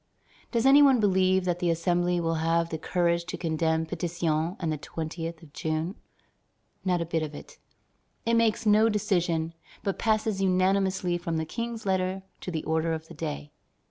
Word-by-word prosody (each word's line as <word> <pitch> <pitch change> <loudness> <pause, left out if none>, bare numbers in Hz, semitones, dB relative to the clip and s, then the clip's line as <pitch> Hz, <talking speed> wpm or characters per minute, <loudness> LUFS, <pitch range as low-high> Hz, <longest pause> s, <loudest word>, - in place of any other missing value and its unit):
Does 235 0 +1
any 275 +2 +8
one 270 -4 +6
believe 190 -2 +3
that 175 -1 0
the 175 - +1
Assembly 175 +1 +1
will 165 -1 0
have 165 +1 +1
the 160 - -4
courage 170 0 +1
to 180 - -5
condemn 160 -1 0
Pétion 170 0 -1
and 165 -3 -1
the - - -3
20th 165 +1 -5
of 145 -3 -16
June? 160 +3 -2 0.9
Not 180 -2 +1
a - - -1
bit 165 0 -1
of 150 -1 -4
it. - - -12 0.7
It 230 - +1
makes 230 -1 +2
no 215 +1 +5
decision, 175 -6 0 0.3
but 195 - -2
passes 215 -2 +1
unanimously 185 -1 +2
from 165 -1 -2
the 160 - -1
King's 230 +4 -5
letter 190 0 0 0.2
to - - -6
the 160 -3 -3
order 160 +1 0
of 160 0 -6
the - - -9
day. 150 -2 -5
175 Hz, 175 wpm, -27 LUFS, 160-195 Hz, 0.9 s, any